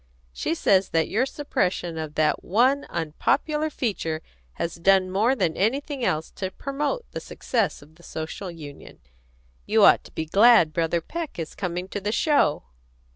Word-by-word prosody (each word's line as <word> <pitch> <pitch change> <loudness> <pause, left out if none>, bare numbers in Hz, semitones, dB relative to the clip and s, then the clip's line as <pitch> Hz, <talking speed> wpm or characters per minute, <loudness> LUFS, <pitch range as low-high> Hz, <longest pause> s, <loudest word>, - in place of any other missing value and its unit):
She - - -2
says 190 +2 +3
that 165 -1 +1
your 245 +6 +1
suppression 180 - -2
of 155 -1 -6
that 155 -1 +1
one 255 +8 +2
unpopular 300 - 0
feature 165 - -3 0.3
has 170 0 -4
done 185 +1 +3
more 220 +7 +2
than 160 -10 0
anything 270 +6 -1
else 155 -6 -1
to 190 - -2
promote 290 - -3
the - - -4
success 225 - -2
of 150 +2 -20
the - - -18
Social 160 +3 -6
Union. 150 -4 -11 0.7
You - - +4
ought - - +6
to - - -14
be 160 - -4
glad 200 -2 +5
Brother 165 +1 0
Peck 330 - -6
is 165 -2 -5
coming 180 -1 -4
to 205 - -4
the 205 +2 -1
show." 285 - +2
190 Hz, 165 wpm, -25 LUFS, 165-250 Hz, 0.7 s, ought